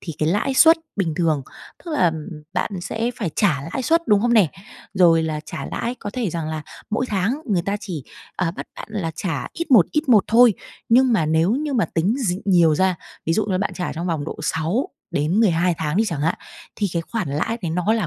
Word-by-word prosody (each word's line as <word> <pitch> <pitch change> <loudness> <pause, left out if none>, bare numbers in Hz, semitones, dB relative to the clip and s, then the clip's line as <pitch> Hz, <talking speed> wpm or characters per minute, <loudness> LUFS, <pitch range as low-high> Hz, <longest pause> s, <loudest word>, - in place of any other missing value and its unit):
thì 165 - -6
cái 155 - +1
lãi 210 +10 0
suất 325 +4 +7 0.2
bình 175 -6 0
thường, 160 -5 +1 0.4
tức 340 - -6
là 180 - +3 0.4
bạn 185 - -1
sẽ 225 +6 -2
phải 195 -7 -2
trả 185 -9 +3 0.2
lãi 265 - -2
suất, 330 +5 +2
đúng 205 -2 +5
không 240 +2 +2
nè? 205 -7 +5 0.5
Rồi 170 -4 +5
là 155 -1 -2
trả - - -6
lãi 235 +1 -3
có 205 - -6
thể 235 -6 -2
rằng 160 -1 -3
là 155 -1 -4 0.3
mỗi 245 +4 0
tháng 215 +7 -1
người 195 -7 +1
ta 200 +3 -1
chỉ, 170 - -6 0.3
ờ, 180 -3 0
bắt 170 - -8
bạn - - -8
là 195 -6 -2
trả 185 -3 -3
ít 335 -2 -5
một, 225 -10 +7
ít 300 -1 -1
một 220 -5 +6
thôi. 235 -1 +6 0.3
Nhưng 255 +2 +5
mà 175 -9 +2
nếu 160 +4 +2
như 290 +3 -1
mà 240 -4 +2
tính 175 +7 +2
d 225 -10 0
nhiều 175 -5 +4
ra, 185 +3 +2 0.3
ví 165 - +2
dụ 215 - +1
như 190 -3 0
bạn 200 - -2
trả 180 - -3
trong 170 +3 -4
vòng 160 -4 -1
độ - - -6
6 160 - -1 0.2
đến 155 +8 +1
12 180 -4 +3
tháng 155 0 -1
đi 220 - +3
chẳng 165 -7 -3
hạn, 165 +3 +1 0.4
thì 205 - 0
cái 170 - -1
khoản 215 -1 -3
lãi 155 +11 -2
đấy 170 - -2
nó 180 +5 +1
là 220 -6 0
185 Hz, 235 wpm, -22 LUFS, 165-230 Hz, 0.5 s, suất